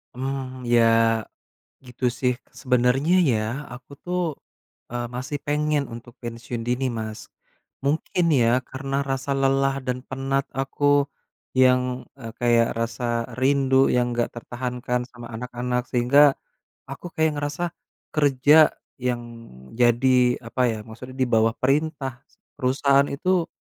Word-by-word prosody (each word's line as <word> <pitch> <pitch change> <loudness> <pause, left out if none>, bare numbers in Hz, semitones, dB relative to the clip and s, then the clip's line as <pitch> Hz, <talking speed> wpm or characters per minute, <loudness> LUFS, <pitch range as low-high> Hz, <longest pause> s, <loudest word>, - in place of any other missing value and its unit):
Hmm 130 0 -4
ya, 120 -1 +4 1.0
gitu 125 +1 -5
sih 125 0 +1 0.2
sebenernya 125 +4 +2 0.2
ya, 110 - +1 0.3
aku 125 +3 -13
tuh, 180 +1 -2 0.7
eee, 120 0 -2
masih 130 +4 -4
pengen 150 0 0
untuk 120 +1 -10
pensiun 115 0 -5
dini 125 +2 0
Mas, 110 -1 -5 0.6
mungkin 160 +4 0
ya 125 -1 +3
karena 135 +1 -2
rasa 135 +1 -2
lelah 135 0 +2
dan 125 -1 -1
penat 135 +1 -1
aku 145 +1 +2 0.5
yang, 125 0 +3
eee, 115 -3 -7
kayak 120 -1 +3
rasa 115 0 -1
rindu 135 0 +3
yang 125 -1 +1
nggak 120 0 0
tertahankan 125 +1 -3
sama 120 -2 -10
anak-anak 125 +1 -2
sehingga, 135 +3 +5 0.5
aku 140 +6 -7
kayak 160 0 +2
ngerasa 145 +4 -2 0.5
kerja 145 +1 +5 0.3
yang 125 -1 -1 0.6
jadi 125 +1 +3
apa 115 +3 -2
ya 110 - -3
maksudnya 125 +4 -10
di 130 - +2
bawah 115 -1 +3
perintah 135 -2 -1 0.4
perusahaan 140 +1 +3
itu, 175 +4 +1
130 Hz, 120 wpm, -24 LUFS, 120-140 Hz, 1.0 s, sehingga